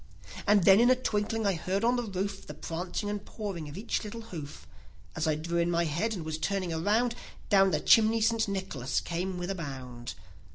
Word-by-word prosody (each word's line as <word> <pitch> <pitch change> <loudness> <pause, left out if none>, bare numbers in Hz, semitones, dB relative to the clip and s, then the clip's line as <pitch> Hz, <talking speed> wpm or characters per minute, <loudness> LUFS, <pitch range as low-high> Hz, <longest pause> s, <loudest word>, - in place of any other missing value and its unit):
nd 205 -3 +5
then, 195 +2 +7
in 240 +1 +6
a 255 - +6
twinkling, 220 -2 -1
I 200 - +3
heard 185 +4 -2
on 240 +2 +3
the 245 - 0
roof 195 -2 -4
The - - -7
prancing 175 +5 -4
and 205 -1 -3
pawing 195 -10 -5
of 145 - -9
each 225 +3 -2
little 220 +2 -6
hoof. 165 -10 -8 0.5
As 160 0 -1
I 155 - +2
drew 170 +3 -2
in 170 0 +2
my 170 0 +2
head, 185 +9 -1
and 170 -4 -6
was 160 0 -3
turning 185 +1 -1
around, 215 +9 +2 0.4
Down 195 -2 +6
the 155 -4 +1
chimney 225 +4 +5
St. 225 0 +2
Nicholas 190 -10 -2
came 180 +2 -3
with 180 +1 -3
a - - -2
bound. 130 -7 -6
190 Hz, 210 wpm, -29 LUFS, 165-215 Hz, 0.5 s, then